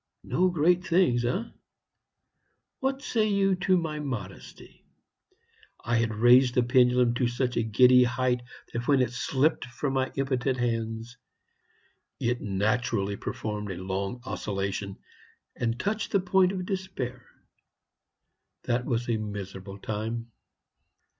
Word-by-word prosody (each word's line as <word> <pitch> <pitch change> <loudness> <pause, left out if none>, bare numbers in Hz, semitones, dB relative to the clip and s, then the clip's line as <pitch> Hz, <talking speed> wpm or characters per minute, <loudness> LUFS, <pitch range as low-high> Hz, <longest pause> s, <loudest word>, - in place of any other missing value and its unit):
No 185 +1 +2
great 175 +2 +2
things, 170 -10 +2
eh? 180 - 0 1.4
What 270 +1 -1
say 220 -5 +1
you 200 -2 +2
to 185 0 +2
my 160 -3 -2
modesty? 130 -7 -7 1.0
I 115 0 +1
had 115 -2 0
raised 125 +3 +5
the 125 - +4
pendulum 125 -1 +4
to 125 0 +1
such 125 +1 -1
a - - +2
giddy 125 +3 +6
height 125 0 0 0.3
that 120 0 -3
when 140 -2 +4
it 120 - -2
slipped 135 +5 0
from 135 +2 -3
my 130 -1 0
impotent 130 -1 0
hands 115 0 -2 1.0
it 120 +1 -1
naturally 100 0 0
performed 105 0 -4
a 95 - -4
long 95 +6 -4
oscillation, 100 -4 -3 0.6
and 115 0 -2
touched 210 +6 -2
the 200 - +5
point 185 0 +2
Despair. 180 -11 -4 1.4
That 125 +1 0
was 120 -2 -1
a 115 -2 +1
miserable 100 -2 -6
time. 110 +3 -4
125 Hz, 125 wpm, -27 LUFS, 115-150 Hz, 1.4 s, giddy